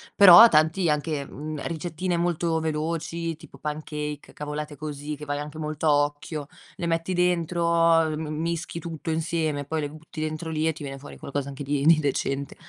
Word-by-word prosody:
Però, 200 +2 +11
ho - - +11
tanti 160 +4 +3
anche, 150 -1 -1
mhmm, 150 +2 -6
ricettine 175 +2 -2
molto 170 -1 0
veloci, 165 +1 -2
tipo - - -15
pancake, 150 -1 -5
cavolate 150 0 -5
così 150 0 -5
che 150 +1 -9
vai 145 0 -2
anche 150 +1 -7
molto 155 0 -2
a - - +6
occhio, 145 0 -6 0.3
le 170 - -4
metti 165 +2 0
dentro, 170 -1 +3
ehm, 155 - -3
m 160 - -4
mischi 170 0 -3
tutto 165 -1 -6
insieme 160 -2 -1
e - - -7
poi 155 +2 -2
le 145 - -3
butti 155 +1 -9
dentro 155 +1 -3
lì 155 0 0
e - - +3
ti 155 - -9
viene 135 -1 -6
fuori 145 - -11
qualcosa 140 0 -4
anche 140 +1 -7
di 140 0 -1
di 160 -1 +7
decente. 140 -1 -1
155 Hz, 195 wpm, -25 LUFS, 150-165 Hz, 0.3 s, Però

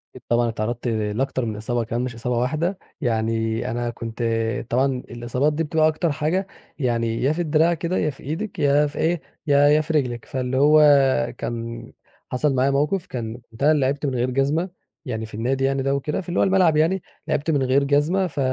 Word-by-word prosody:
أكيد 130 - -11
طبعًا 120 0 +2
اتعرضت 115 +2 -3
لأكتر 115 +3 -1
من 110 -2 -3
إصابة 115 +2 -1
كمان 115 +2 -2
مش 125 -2 -4
إصابة 120 +1 -2
واحدة، 155 +10 0 0.2
يعني 115 -2 -1
أنا 120 0 -2
كنت 115 0 -6 0.5
طبعًا 130 +3 +2 0.2
الإصابات 120 +5 -1
دي 160 +2 -1
بتبقى 155 0 +2
أكتر 155 +1 0
حاجة، 160 +6 -1 0.3
يعني 115 -3 0
يا 140 - +3
في 175 - -2
الدراع 160 +1 +3
كده، 170 +3 -2
يا 155 - +1
في 135 - -10
إيدِك، 175 +6 -4
يا 145 +1 +3
في 145 - -9
إيه، 170 0 +1 0.3
يا 145 0 +5
يا 150 +1 +5
في 160 +1 -4
رجلِك. 125 -6 0
فاللي 130 0 -2
هو 150 +2 +6 0.6
كان 115 0 -5 0.5
حصل 135 +2 +1
معايا 135 +2 +2
موقف، 150 +7 0
كان 115 -2 -5
كنت 115 +4 -7
أنا 150 - +6
اللي 150 -3 +2
لعبت 140 +2 -1
من 135 - -1
غير 125 +1 0
جزمة، 145 +8 0 0.4
يعني 110 -3 -3
في 110 - -14
النادي 130 +5 -1
يعني 135 0 +1
ده 135 0 +1
وكده 150 +6 -2
في 175 - -10
اللي 175 - 0
هو - - +5
الملعب 185 -5 +3
يعني، 170 +5 +2 0.3
لعبت 150 +3 0
من 140 -3 +1
غير 130 +2 +3
جزمة، 150 +7 +2
ف 145 -3 -6
135 Hz, 205 wpm, -23 LUFS, 120-155 Hz, 0.6 s, هو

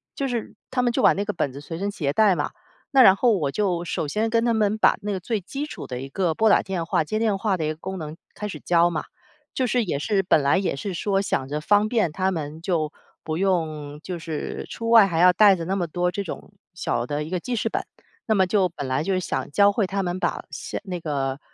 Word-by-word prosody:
就 275 - -1
是， 235 -3 -4 0.2
他 255 -1 +1
们 240 -1 +2
就 - - +1
把 - - +7
那 200 - -2
个 210 - -1
本 140 -6 -2
子 140 - -8
随 165 +3 -7
身 200 +1 -1
携 145 -8 -2
带 210 -4 +4
嘛。 - - -2 0.4
那 270 -1 +6
然 190 -2 +8
后 225 -1 +3
我 145 -4 -1
就 180 -3 -1
首 155 - -2
先 220 +7 0
跟 230 0 +2
他 235 - +2
们 215 -1 +1
把 - - +4
那 205 0 -2
个 190 - -2
最 220 +2 -1
基 275 +10 -5
础 - - -8
的 125 0 -5
一 135 - -7
个 175 0 0
拨 220 +4 +3
打 - - +5
电 180 -4 -3
话、 165 - +1
接 215 - -2
电 215 -3 +1
话 200 -2 0
的 160 - -3
一 - - 0
个 155 - -4
功 190 +3 -6
能 155 +1 -7 0.2
开 210 - -4
始 - - -7
教 175 0 +3
嘛， 155 -3 -3 0.5
就 260 - 0
是 240 -2 +1
也 145 -5 -2
是 200 +4 +1
本 160 -5 +3
来 140 +7 +3
也 190 - 0
是 185 +7 -4
说 195 +2 0
想 135 -9 -1
着 150 +2 -3
方 205 +5 +3
便 220 -10 +1
他 190 +3 0
们， 155 -1 -5
就 165 -5 -1 0.3
不 155 0 -3
用 155 -6 -1
就 180 -2 -5
是 160 -2 -5
出 230 0 -4
外 225 -4 +8
还 165 -3 -1
要 180 +1 +7
带 200 0 +6
着 170 - -5
那 190 - -1
么 175 -2 -1
多 180 +2 -1
这 200 +2 -3
种 180 - -8 0.2
小 120 -8 -2
的 150 +1 -2
一 155 - -7
个 180 -1 -1
记 245 +6 -3
事 225 0 -1
本。 - - -2 0.4
那 220 - +3
么 190 -1 +4
就 190 -2 +3
本 150 -4 -6
来 130 +2 0
就 195 +3 0
是 185 - +1
想 - - -3
教 200 +5 +5
会 200 -2 0
他 195 0 -2
们 180 0 -2
把 - - -1
写 - - -5
那 180 -2 -4
个， 140 -3 -2
185 Hz, 290 characters per minute, -24 LUFS, 160-210 Hz, 0.5 s, 然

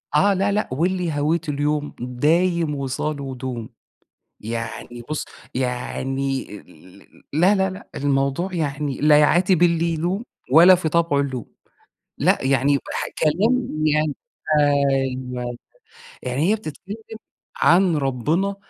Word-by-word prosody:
آه، 200 0 +4
لأ 195 +1 +1
لأ، 210 +1 -1
واللي 175 +4 0
هويته 155 +1 0
اليوم 145 +1 -1
دايم 155 +6 +1
وصاله 140 0 -3
دوم، 125 -3 -5 0.7
يعني 115 +2 -6
بُص، 155 0 -2 0.3
يعني 135 +1 -2
ال 90 +3 -18 0.3
لأ 180 +7 +4
لأ 190 -1 +1
لأ، 190 - -10
الموضوع 140 +6 0
يعني 145 -3 -2
لا 150 0 +6
يعاتب 175 +3 +3
اللي 170 -1 +3
يلوم، 180 +8 -2 0.3
ولا 175 +4 +9
في 175 -3 -1
طبعه 165 -3 +2
اللوم. 130 -4 -3 0.7
لأ، - - +3
يعني 135 +1 +2 0.2
واحد - - -4
كلام 220 - +2 0.2
يعني 155 -1 +2 0.5
أيوه، 130 -4 0 0.7
يعني 135 +8 0
هي - - +3
بتتكلّم 200 +1 -8 0.6
عن 175 -1 +4
ربنا، 150 +9 0
150 Hz, 120 wpm, -22 LUFS, 135-175 Hz, 0.7 s, ولا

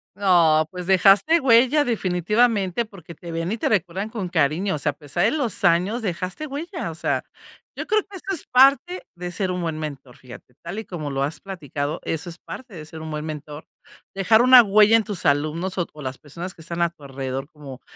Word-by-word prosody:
No, 170 -5 +4
pues 180 -1 -7
dejaste 195 - +5
huella 260 +3 +4
definitivamente 210 +1 +1
porque 180 -6 -13
te 170 +2 -9
ven 165 +2 -3
y 225 - -2
te - - -1
recuerdan 195 +1 -1
con 210 -5 -4
cariño, 165 +3 0
o - - -5
sea, 150 - 0
a - - -17
pesar 150 +4 -2
de 220 - +3
los 250 -7 -2
años 185 +7 +2
dejaste 185 - -4
huella. 300 - -5
O 160 - -10
sea, - - -1 0.5
yo - - -5
creo 430 -1 +2
que 400 - -14
eso - - -11
es 335 - -4
parte 275 +8 +4
de 175 0 -6
ser 190 0 -2
un 180 0 -3
buen 165 -2 -3
mentor, 140 -5 -7
fíjate, 125 -1 -14
tal 175 +5 -5
y 220 - -7
como 155 -6 -5
lo 135 0 -1
has 150 +4 -3
platicado, 150 -6 -5
eso 165 +2 -3
es 170 - -9
parte 250 -6 -10
de 155 -2 -8
ser 160 0 -10
un 160 0 -7
buen 150 0 -4
mentor. 150 -1 -7 0.5
Dejar 210 +4 +4
una 255 -1 +9
huella 215 +1 +5
en 225 - 0
tus 205 -5 -4
alumnos, 155 +6 0
o 175 - -1
o 150 - -11
las 130 -1 -5
personas 170 +5 -8
que 165 - -16
están 170 +1 -5
a 170 - +3
tu 155 - -20
alrededor 135 0 -5
como 140 -4 -11
180 Hz, 220 wpm, -23 LUFS, 155-220 Hz, 0.5 s, una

